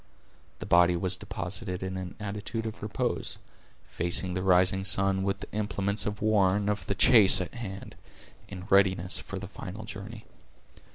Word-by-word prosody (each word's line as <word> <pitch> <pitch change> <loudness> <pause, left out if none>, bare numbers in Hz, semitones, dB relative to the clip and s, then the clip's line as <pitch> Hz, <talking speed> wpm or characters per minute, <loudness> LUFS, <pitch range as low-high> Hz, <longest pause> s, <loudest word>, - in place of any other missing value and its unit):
The - - -8
body 90 0 +4
was 90 +1 -1
deposited 90 +1 -6
in 95 0 -4
an 95 -1 -6
attitude 105 +2 -5
of 110 0 -6
repose, 105 -1 -3 0.5
facing 90 +2 -1
the 95 - -2
rising 95 +1 +3
sun, 95 0 +3
with 100 0 -2
the - - -8
implements 100 -1 -1
of 105 0 -4
war 100 -3 +3
and 105 0 0
of 105 - -5
the 100 - -1
chase 105 -2 +7
at 90 - -5
hand, 100 -5 -8 0.5
in 95 -2 -9
readiness 95 -2 +2
for 95 +1 -7
the 95 0 -7
final 100 +2 -9
journey. 105 +2 -9
95 Hz, 165 wpm, -28 LUFS, 95-105 Hz, 0.5 s, chase